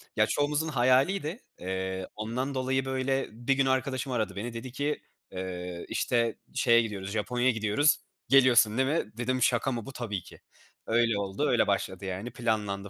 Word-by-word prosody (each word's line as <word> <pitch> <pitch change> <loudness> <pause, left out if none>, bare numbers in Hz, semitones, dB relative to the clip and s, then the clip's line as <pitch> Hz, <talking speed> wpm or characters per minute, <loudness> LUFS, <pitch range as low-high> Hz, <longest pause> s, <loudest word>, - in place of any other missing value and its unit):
Ya, - - +4
çoğumuzun 150 +2 0
hayaliydi. 150 - +2 0.2
Eee, 95 0 -3
ondan 125 +6 -3
dolayı, 130 +1 0
böyle, 135 0 0
bir 120 +5 0
gün 135 0 +2
arkadaşım 130 0 0
aradı 110 -4 -1
beni 115 +4 -4
dedi 120 +2 -6
ki, 145 +3 -2 0.3
eee, 90 -2 -5
işte, 115 -2 +1 0.2
şeye 115 0 +5
gidiyoruz, 100 -3 -4
Japonya’ya 120 +4 +1
gidiyoruz, 110 +7 +2 0.3
geliyorsun 125 -4 +6
değil 130 +1 +2
mi? 150 -9 -1
Dedim 130 +1 -1
şaka 125 +2 +2
mı 115 -3 -4
bu? 135 - -7
Tabii 105 -6 -3
ki. - - -14 0.5
Öyle 115 -2 +2
oldu, 95 -1 -1
öyle - - +3
başladı, 100 - -1
yani, 95 +6 -4
planlandı, 105 -4 -2
120 Hz, 165 wpm, -29 LUFS, 105-130 Hz, 0.5 s, geliyorsun